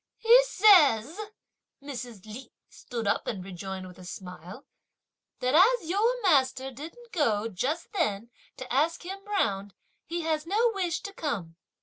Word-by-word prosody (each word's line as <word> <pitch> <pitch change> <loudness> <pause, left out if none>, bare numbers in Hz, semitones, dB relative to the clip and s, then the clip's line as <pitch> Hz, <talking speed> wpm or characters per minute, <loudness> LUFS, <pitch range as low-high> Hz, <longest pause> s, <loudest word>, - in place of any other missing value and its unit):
"He 475 +2 +6
says," 320 - +5 0.6
Mrs. 245 -7 -8
Li 230 +4 -10 0.2
stood 235 -2 -6
up 200 - 0
and 190 -5 -4
rejoined 190 0 -6
with 180 0 -13
a - - -11
smile, 180 - -9 0.8
"that 255 +1 0
as 375 +3 +5
your 445 +8 +1
master 265 -6 +2
didn't 335 - -11
go 225 - +1
just 255 - -3
then 235 - -1 0.3
to 255 -1 -7
ask 315 +7 +1
him 390 +2 -7
round, 205 - -1 0.3
he 340 +1 -3
has 315 -1 -2
no 450 +5 +2
wish 360 -5 -2
to 400 - -8
come!" 210 - -4
275 Hz, 145 wpm, -28 LUFS, -, 0.8 s, He